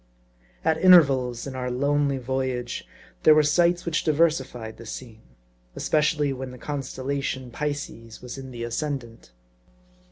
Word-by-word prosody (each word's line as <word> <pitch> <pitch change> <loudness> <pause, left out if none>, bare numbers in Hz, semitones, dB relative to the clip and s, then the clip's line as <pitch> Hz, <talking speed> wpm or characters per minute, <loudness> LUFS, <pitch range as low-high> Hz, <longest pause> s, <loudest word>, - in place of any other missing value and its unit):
AT 160 0 +2
intervals 135 -10 +5
in 135 -2 -6
our 125 -1 -3
lonely 140 +2 +1
voyage, 130 -1 -3 0.3
there 155 - +7
were 155 - +5
sights 175 +4 +2
which 165 -2 0
diversified 135 -8 0
the 115 - -11
scene; 115 -1 -8 0.5
especially 150 -2 +1
when 130 0 -6
the 125 - -10
constellation 135 -2 -4
Pisces 145 -5 -5
was 125 -1 -8
in 135 -1 -8
the 120 -2 -6
ascendant. 120 - -4
135 Hz, 130 wpm, -25 LUFS, 125-150 Hz, 0.5 s, there